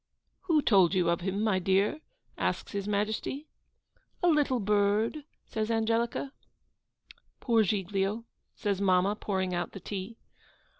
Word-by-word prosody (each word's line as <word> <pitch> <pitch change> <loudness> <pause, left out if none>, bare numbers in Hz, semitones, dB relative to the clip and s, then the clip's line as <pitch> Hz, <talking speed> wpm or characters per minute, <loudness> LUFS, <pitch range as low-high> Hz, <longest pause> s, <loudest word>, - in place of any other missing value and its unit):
'Who 320 -5 +3
told 190 -4 +4
you 175 -2 +3
of 170 - -1
him, 195 +3 -1
my 210 -4 +2
dear?' 195 - +1 0.3
asks - - -2
His 200 -1 -3
Majesty. 215 +7 -2 0.8
'A 355 - +5
little 290 -5 +2
bird,' 210 +7 +1 0.2
says 220 0 -3
Angelica. 230 +4 0 1.1
'Poor 230 -3 +3
Giglio!' 200 +2 -1 0.3
says 200 -2 -1
mamma, 190 +1 +3
pouring 190 -3 -2
out 175 -1 -3
the 195 - -7
tea. 200 +4 -6
205 Hz, 130 wpm, -29 LUFS, 190-230 Hz, 1.1 s, A